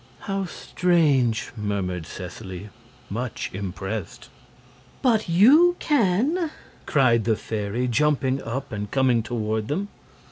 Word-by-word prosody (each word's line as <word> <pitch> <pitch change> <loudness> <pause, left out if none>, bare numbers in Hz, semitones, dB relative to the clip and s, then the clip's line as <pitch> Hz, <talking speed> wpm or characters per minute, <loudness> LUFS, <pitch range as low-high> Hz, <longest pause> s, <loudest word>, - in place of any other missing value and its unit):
"How 195 -1 -2
strange!" 150 -11 +1
murmured 95 -6 -3
Seseley, 95 +1 -8 0.4
much 115 +3 -4
impressed. 95 +1 -5 0.7
"But 225 -7 +2
YOU 285 - +6
can," 290 - +1 0.4
cried 120 -6 +3
the 115 -1 +3
fairy, 110 +3 -3
jumping 135 +1 +1
up 130 +4 -5
and 105 -1 -4
coming 130 -2 +2
toward 110 -2 -2
them. 190 +9 -2
125 Hz, 105 wpm, -24 LUFS, 105-180 Hz, 0.7 s, YOU